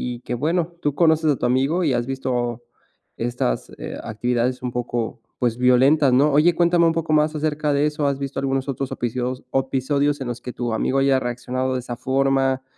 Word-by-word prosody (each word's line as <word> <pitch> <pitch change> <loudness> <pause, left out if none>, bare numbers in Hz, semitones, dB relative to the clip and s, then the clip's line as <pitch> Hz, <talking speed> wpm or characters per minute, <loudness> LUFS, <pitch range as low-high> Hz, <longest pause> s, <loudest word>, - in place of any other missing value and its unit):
y - - -11
que, 125 - -5
bueno, 165 +6 -1
tú 145 -1 -1
conoces 160 -2 +3
a - - +1
tu - - -2
amigo 135 +8 +1
y 150 -5 +2
has 120 0 -1
visto 125 -3 -2 0.5
estas 115 - -2
eh, - - -6
actividades 120 +3 -1
un 125 - -2
poco, 120 -1 -3 0.2
pues, 120 -2 0
violentas, 130 +3 +4
¿no? 145 +4 +4
Oye, 155 +4 +4
cuéntame 170 0 +3
un 165 - +3
poco 165 -1 -1
más 155 0 +2
acerca 150 -1 0
de 140 +1 +2
eso, 150 -1 0
¿has 140 -1 0
visto 140 0 -4
algunos 135 0 -1
otros 135 -1 -3
episos 125 +2 -3
episodios 135 +2 0
en 130 - -3
los 120 0 -5
que 125 - -7
tu 120 -2 -3
amigo 130 +4 0
haya 135 -1 +3
reaccionado 125 +1 -2
de 130 - -1
esa 120 -1 -6
forma, 135 +1 +1
135 Hz, 200 wpm, -22 LUFS, 125-150 Hz, 0.5 s, violentas